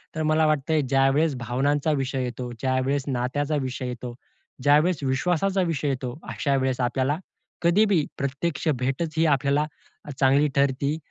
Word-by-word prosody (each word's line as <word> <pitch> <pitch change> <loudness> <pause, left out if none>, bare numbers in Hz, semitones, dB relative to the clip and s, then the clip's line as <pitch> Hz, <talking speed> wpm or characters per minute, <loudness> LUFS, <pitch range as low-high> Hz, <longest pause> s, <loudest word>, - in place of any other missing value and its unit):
तर 160 - -1
मला 155 +1 +3
वाटत 155 0 0
आहे, 155 - +3
ज्यावेळेस 135 +3 +2
भावनांचा 140 +6 0
विषय 135 -1 -2
येतो, 125 0 -5
ज्यावेळेस 130 +1 0
नात्याचा 140 +3 -1
विषय 130 0 -4
येतो, 125 0 -6 0.5
ज्यावेळेस 150 +3 +3
विश्वासाचा 180 +8 +1
विषय 145 -1 -2
येतो 130 -2 -3
अशा 140 -2 0
वेळेस 130 -1 0
आपल्याला, 130 +4 0 0.5
कधी 180 +6 +4
बी 180 -8 +2
प्रत्यक्ष 140 +4 -2
भेटच 135 +5 -2
ही 165 - +4
आपल्याला 140 +1 +2 0.4
अ, - - -9
चांगली 140 +2 +4
ठरती 140 +2 +1
140 Hz, 150 wpm, -25 LUFS, 130-155 Hz, 0.5 s, कधी